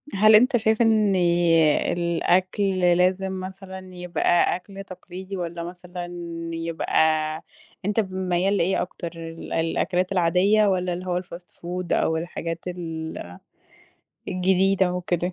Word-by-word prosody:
هل 215 Hz, +2 st, +7 dB
أنت 250 Hz, +4 st, +5 dB
شايف 220 Hz, 0 st, +1 dB
إن 215 Hz, -3 st, +3 dB, 0.8 s
الأكل 185 Hz, +3 st, +1 dB
لازم 185 Hz, +2 st, +2 dB
مثلًا 190 Hz, 0 st, -8 dB
يبقى 175 Hz, -1 st, +1 dB
أكْل 195 Hz, +2 st, -9 dB
تقليدي 185 Hz, +1 st, -8 dB
والّا 170 Hz, -1 st, -4 dB
مثلًا 180 Hz, 0 st, -7 dB, 0.5 s
يبقى 165 Hz, 0 st, -2 dB, 0.9 s
أنت 210 Hz, +2 st, +1 dB
ميّال 190 Hz, -1 st, 0 dB
لإيه 190 Hz, +2 st, +1 dB
أكتر 175 Hz, -1 st, -5 dB
ال 165 Hz, 0 st, -8 dB
الأكلات 175 Hz, +3 st, 0 dB
العادية 190 Hz, +4 st, +3 dB
والّا 185 Hz, -2 st, +1 dB
اللي 180 Hz, +1 st, -6 dB
هو 180 Hz, -1 st, -1 dB
الfast 175 Hz, -1 st, -12 dB
food 180 Hz, 0 st, -5 dB
أو 160 Hz, -, +1 dB
الحاجات 165 Hz, 0 st, -5 dB
ال 160 Hz, -, -6 dB, 0.9 s
الجديده 190 Hz, 0 st, +2 dB
وكده؟ 180 Hz, 0 st, -2 dB
180 Hz, 115 wpm, -24 LUFS, 175-190 Hz, 0.9 s, هل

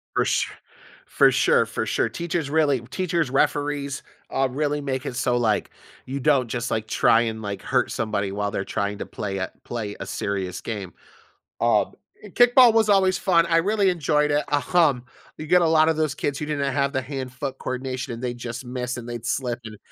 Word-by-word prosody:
For -, -, +2 dB
su -, -, 0 dB, 0.5 s
for -, -, +4 dB
sure, 480 Hz, -1 st, +3 dB
for -, -, -3 dB
sure. -, -, 0 dB
Teachers 170 Hz, -3 st, -3 dB
really 145 Hz, -4 st, +2 dB
teachers, 165 Hz, +4 st, -1 dB
referees, 145 Hz, 0 st, 0 dB, 0.3 s
uh, 135 Hz, -, +1 dB
really 145 Hz, +2 st, -1 dB
make 130 Hz, -2 st, -3 dB
it 125 Hz, -, -4 dB
so, 125 Hz, -1 st, +1 dB
like, 110 Hz, -4 st, +1 dB, 0.4 s
you 135 Hz, +2 st, -4 dB
don't 140 Hz, -3 st, +3 dB
just, 120 Hz, +1 st, -2 dB
like, 110 Hz, -1 st, -1 dB
try 115 Hz, +1 st, +4 dB
and, 110 Hz, -1 st, -3 dB
like, 100 Hz, -2 st, -5 dB
hurt -, -, +1 dB
somebody 105 Hz, -3 st, -2 dB
while 100 Hz, 0 st, -2 dB
they're 95 Hz, -, -3 dB
trying 100 Hz, 0 st, -2 dB
to -, -, -4 dB
play 100 Hz, -1 st, -5 dB
a 95 Hz, -1 st, -2 dB
play 110 Hz, -4 st, -5 dB
a -, -, -4 dB
serious 95 Hz, -3 st, -3 dB
game. 100 Hz, -5 st, -5 dB, 0.7 s
Um, -, -, +2 dB, 0.3 s
and 210 Hz, -3 st, -13 dB
kickball 245 Hz, -1 st, +7 dB
was 225 Hz, -1 st, +3 dB
always 190 Hz, -2 st, +4 dB
fun, 170 Hz, -3 st, +3 dB
I 165 Hz, -, +2 dB
really 200 Hz, +4 st, +2 dB
enjoyed 150 Hz, -3 st, +1 dB
it, 145 Hz, 0 st, +1 dB, 0.3 s
um, 145 Hz, -8 st, +4 dB, 0.3 s
you 155 Hz, -, -6 dB
get 180 Hz, +3 st, +4 dB
a -, -, +4 dB
lotta 160 Hz, 0 st, +4 dB
those 155 Hz, -3 st, 0 dB
kids 140 Hz, -2 st, -2 dB
who 150 Hz, -, -4 dB
didn't 140 Hz, -2 st, -1 dB
have 140 Hz, 0 st, 0 dB
the 130 Hz, -, -1 dB
hand-foot 130 Hz, 0 st, -5 dB
coordination 130 Hz, 0 st, -4 dB
and 115 Hz, +1 st, -7 dB
they 125 Hz, -1 st, -2 dB
just 120 Hz, +1 st, -6 dB
miss 125 Hz, 0 st, -4 dB
and 120 Hz, -1 st, -8 dB
they'd 120 Hz, -1 st, -6 dB
slip 125 Hz, -3 st, -1 dB
and 110 Hz, -1 st, -8 dB
135 Hz, 200 wpm, -24 LUFS, 120-155 Hz, 0.7 s, kickball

